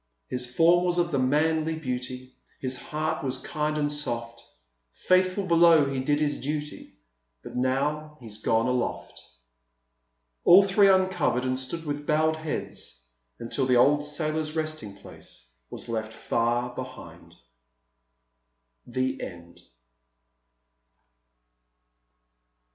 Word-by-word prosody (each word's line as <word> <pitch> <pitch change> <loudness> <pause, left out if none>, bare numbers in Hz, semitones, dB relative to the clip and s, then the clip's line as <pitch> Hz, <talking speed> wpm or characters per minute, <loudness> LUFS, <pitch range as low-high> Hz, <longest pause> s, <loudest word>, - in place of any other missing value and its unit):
His 125 0 -2
form 170 +5 +4
was 175 -1 0
of 170 -1 +1
the 140 - +1
manliest 160 +4 +1
beauty, 125 0 -4 0.3
His 130 -1 -1
heart 155 -1 -3
was 130 -2 -1
kind 150 0 -2
and 145 -1 0
soft; 115 -5 -4 0.5
Faithful 185 +1 +1
below 170 -3 +5
he 135 -1 -2
did 145 +3 +1
his 150 -1 -1
duty, 150 +1 -5 0.5
But - - -9
now 145 +4 -1
he's 110 -3 -10
gone 115 +1 +2
aloft." 125 -1 -2 1.2
All 185 +3 +8
three 195 +1 +4
uncovered 185 -9 +2
and 130 0 -1
stood 160 +6 -6
with 145 0 -4
bowed 155 +1 +2
heads 155 - -6 0.3
until 115 +2 -2
the 125 - +3
old 145 +4 +4
sailor's 155 +1 -2
resting 155 -10 -4
place 65 -10 -14 0.2
was - - -7
left 110 -1 -3
far 120 +2 -1
behind. 130 -1 -10 1.5
THE 130 +1 -2
END. 85 -1 -9
145 Hz, 115 wpm, -26 LUFS, 125-155 Hz, 1.5 s, All